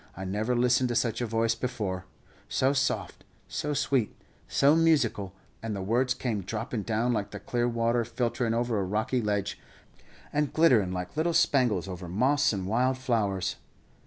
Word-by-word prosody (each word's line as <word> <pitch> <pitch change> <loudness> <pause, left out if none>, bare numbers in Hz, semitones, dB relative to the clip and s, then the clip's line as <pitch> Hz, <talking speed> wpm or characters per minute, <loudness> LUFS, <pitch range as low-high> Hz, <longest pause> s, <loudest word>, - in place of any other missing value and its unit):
I 95 - -5
never 105 +6 -1
listened 125 +1 +3
to 120 - -1
such 115 0 0
a 120 - -1
voice 115 +1 +1
before, 110 -7 -3 0.4
so 135 +1 +2
soft, 135 -1 -1 0.2
so 150 0 -3
sweet, 130 -6 +1 0.4
so 140 +3 +4
musical, 140 - +2 0.3
and 115 -2 -3
the 95 - -4
words 125 +5 +1
came 110 -5 -2
droppin' 110 +4 -4
down, 115 +3 0
like 105 -2 -2
the - - -7
clear 120 0 -1
water 115 0 +1
filterin' 120 0 -1
over 120 -2 0
a - - 0
rocky 110 +6 0
ledge, 100 -2 -2 0.7
and 150 -1 +1
glitterin' 125 - +4
like 90 +3 -5
little 165 +2 +1
spangles 125 - +2
over 90 -1 -6
moss 140 +10 +2
and 95 -3 -3
wild 125 +6 +1
flowers. 110 -7 -1
115 Hz, 165 wpm, -28 LUFS, 105-130 Hz, 0.7 s, so